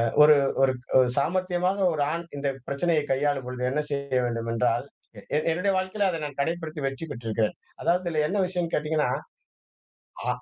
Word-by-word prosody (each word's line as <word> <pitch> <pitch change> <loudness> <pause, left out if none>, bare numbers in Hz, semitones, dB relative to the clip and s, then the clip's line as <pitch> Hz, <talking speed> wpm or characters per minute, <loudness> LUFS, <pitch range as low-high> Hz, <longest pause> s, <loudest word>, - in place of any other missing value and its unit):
அ - - +3 0.2
ஒரு 150 -1 +8 0.3
ஒரு 130 -1 +2 0.3
ஒரு 125 - +4
சாமர்த்தியமாக 185 +4 +1
ஒரு 145 -2 +1
ஆண் 170 0 -4
இந்த 140 0 -1 0.2
பிரச்சனையை 150 +2 +1
கையாளும் 135 -1 0
பொழுது 125 0 -4
என்ன 150 +3 0
செய்ய 140 -2 0
வேண்டுமென்றால், 115 +1 0 0.3
எ - - -10
என் 155 - 0
என்னுடைய 180 +4 +1
வாழ்க்கையில 190 +2 0
அதை 165 - -3
நான் 145 -1 -10
கடைப்பிடித்து 160 -1 -3
வச்சுக்கிட்டுருக்கேன். 115 -7 -3 0.3
அதாவது, 180 +2 +2
இதில 155 -2 +1
என்ன 200 +3 0
விஷயம்ன்னு 175 -2 -2
கேட்டீங்கன்னா 150 -2 +1 1.2
ஆ. - - -1
150 Hz, 160 wpm, -26 LUFS, 135-175 Hz, 1.2 s, ஒரு